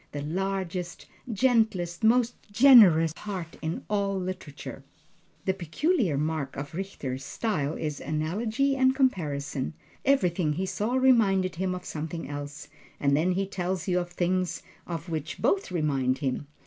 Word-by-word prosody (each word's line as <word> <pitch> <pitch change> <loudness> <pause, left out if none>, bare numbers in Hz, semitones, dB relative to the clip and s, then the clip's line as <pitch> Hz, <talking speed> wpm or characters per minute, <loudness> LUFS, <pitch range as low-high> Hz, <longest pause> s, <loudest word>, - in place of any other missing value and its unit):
The 145 -1 -4
largest, 180 +1 -3 0.3
gentlest, 220 -7 +1
most 235 +2 +4 0.2
generous 205 - +7
heart 185 -6 -6
in 160 +1 -3
all 200 -2 0
literature! 180 -6 -6 0.6
The 190 - +2
peculiar 190 - 0
mark 155 -2 -2
of 145 +3 -6
Richter's 145 -8 -4
style 155 -3 -2
is 150 -2 -3
analogy 215 - 0
and 260 0 +3
comparison; 150 - -1 0.3
everything 180 - +2
he 185 +5 -2
saw 215 +6 -1
reminded 210 -9 +3
him 185 0 -1
of 180 0 -8
something 160 +2 -5
else, 145 +1 -6 0.3
and 140 -1 +3
then 170 +5 +2
he 195 +2 0
tells 185 -2 -3
you 180 -1 +2
of 175 0 -4
things 175 -1 -1 0.2
of 170 -1 -5
which 160 +2 -4
both 195 0 +1
remind 140 -6 +1
him. 140 0 -2
180 Hz, 140 wpm, -27 LUFS, 155-200 Hz, 0.6 s, generous